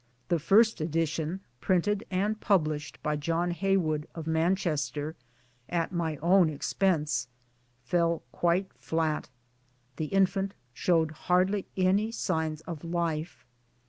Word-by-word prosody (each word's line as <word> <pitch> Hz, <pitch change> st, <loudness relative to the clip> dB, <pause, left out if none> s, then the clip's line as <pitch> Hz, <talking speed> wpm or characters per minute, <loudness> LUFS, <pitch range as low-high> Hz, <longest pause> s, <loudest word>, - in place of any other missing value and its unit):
The 170 Hz, -2 st, +2 dB
first 210 Hz, +4 st, +4 dB
edition, 160 Hz, +2 st, -1 dB, 0.2 s
printed 195 Hz, +3 st, +1 dB
and 205 Hz, +3 st, 0 dB
published 155 Hz, -, +1 dB
by 150 Hz, 0 st, 0 dB
John 165 Hz, +4 st, 0 dB
Heywood 170 Hz, -4 st, +1 dB
of 165 Hz, -2 st, -6 dB
Manchester, 160 Hz, -3 st, 0 dB, 0.5 s
at 170 Hz, 0 st, 0 dB
my 165 Hz, -3 st, -1 dB
own 180 Hz, -1 st, +5 dB
expense, 150 Hz, -4 st, 0 dB, 0.6 s
fell 170 Hz, +4 st, +1 dB
quite 175 Hz, +3 st, +1 dB
flat. 160 Hz, -3 st, -1 dB, 0.7 s
The 155 Hz, -, -1 dB
infant 195 Hz, +3 st, +1 dB, 0.2 s
showed 165 Hz, +1 st, +2 dB
hardly 185 Hz, +5 st, +1 dB
any 195 Hz, +4 st, +2 dB
signs 160 Hz, -8 st, -1 dB
of 160 Hz, -2 st, -7 dB
life. 170 Hz, -2 st, -2 dB
170 Hz, 110 wpm, -29 LUFS, 155-190 Hz, 0.7 s, own